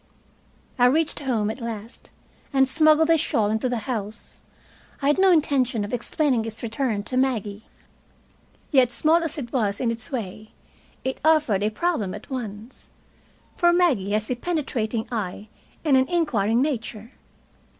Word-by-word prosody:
I 245 Hz, -, +6 dB
reached 305 Hz, +4 st, +1 dB
home 230 Hz, -7 st, 0 dB
at 240 Hz, -, -9 dB
last, 230 Hz, 0 st, -7 dB, 0.4 s
and 270 Hz, -1 st, +3 dB
smuggled 310 Hz, +3 st, +4 dB
the 330 Hz, -1 st, +5 dB
shawl 210 Hz, -6 st, +1 dB
into 220 Hz, +3 st, 0 dB
the 235 Hz, -4 st, -3 dB
house. 215 Hz, -4 st, -5 dB, 0.6 s
I 280 Hz, -, +1 dB
had 295 Hz, -, +2 dB
no 385 Hz, 0 st, +5 dB
intention 265 Hz, -, +2 dB
of 205 Hz, -, -8 dB
explaining 245 Hz, 0 st, 0 dB
its 225 Hz, +1 st, -7 dB
return 225 Hz, -2 st, -1 dB
to 255 Hz, -, -3 dB
Maggie. 220 Hz, -6 st, -1 dB, 1.1 s
Yet, 260 Hz, -4 st, +4 dB
small 310 Hz, +8 st, +3 dB
as 330 Hz, -1 st, -4 dB
it 240 Hz, -5 st, -6 dB
was 210 Hz, -6 st, 0 dB
in 235 Hz, -2 st, 0 dB
its 230 Hz, +2 st, -7 dB
way, 215 Hz, -3 st, -6 dB, 0.5 s
it 260 Hz, 0 st, -3 dB
offered 300 Hz, -11 st, +3 dB
a 210 Hz, -, +2 dB
problem 220 Hz, -, -1 dB
at -, -, -12 dB
once. 225 Hz, -2 st, -7 dB, 0.7 s
For 345 Hz, -1 st, +4 dB
Maggie 320 Hz, -, +2 dB
has 215 Hz, +3 st, 0 dB
a -, -, +1 dB
penetrating 240 Hz, -7 st, -2 dB
eye 210 Hz, -2 st, -4 dB, 0.4 s
and 290 Hz, -3 st, +4 dB
an 260 Hz, 0 st, +3 dB
inquiring 240 Hz, -, +1 dB
nature. 235 Hz, -5 st, -4 dB
245 Hz, 155 wpm, -24 LUFS, 215-290 Hz, 1.1 s, I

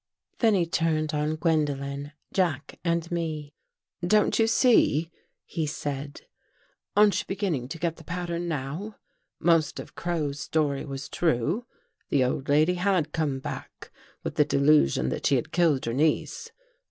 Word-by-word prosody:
Then 225 Hz, -3 st, +4 dB
he 175 Hz, -3 st, +2 dB
turned 160 Hz, -2 st, 0 dB
on 150 Hz, +1 st, 0 dB
Gwendolen, 145 Hz, -3 st, -1 dB, 0.2 s
Jack 165 Hz, -7 st, -1 dB
and 170 Hz, -1 st, 0 dB
me. 155 Hz, -4 st, -3 dB, 0.5 s
"Don't 210 Hz, +6 st, +3 dB
you 225 Hz, -, +4 dB
see?" 195 Hz, -, +4 dB, 0.3 s
he 160 Hz, -3 st, -2 dB
said. 145 Hz, -1 st, -5 dB, 0.8 s
"Aren't 210 Hz, -1 st, +5 dB
you -, -, -4 dB
begin 195 Hz, -2 st, -1 dB
ning 125 Hz, -4 st, -3 dB
to 165 Hz, -, -6 dB
get 165 Hz, 0 st, -2 dB
the 160 Hz, -, -13 dB
pattern 175 Hz, +1 st, -3 dB
now? 160 Hz, +8 st, -4 dB, 0.4 s
Most 165 Hz, -3 st, +2 dB
of -, -, -9 dB
Crow's 155 Hz, -5 st, -2 dB
story 150 Hz, -3 st, 0 dB
was 135 Hz, -1 st, -6 dB
true. 165 Hz, -, 0 dB, 0.4 s
The 135 Hz, -, +3 dB
old 130 Hz, +2 st, -2 dB
lady 155 Hz, +5 st, +4 dB
had 180 Hz, -4 st, +1 dB
come 150 Hz, -5 st, 0 dB
back 130 Hz, -, -8 dB, 0.3 s
with -, -, -5 dB
the 150 Hz, -, +6 dB
delusion 140 Hz, -, +3 dB
that -, -, -1 dB
she 140 Hz, -, +4 dB
had 155 Hz, +5 st, -2 dB
killed 165 Hz, -7 st, +2 dB
her 115 Hz, -, -2 dB
niece. 155 Hz, +5 st, 0 dB
155 Hz, 155 wpm, -27 LUFS, 145-175 Hz, 0.8 s, the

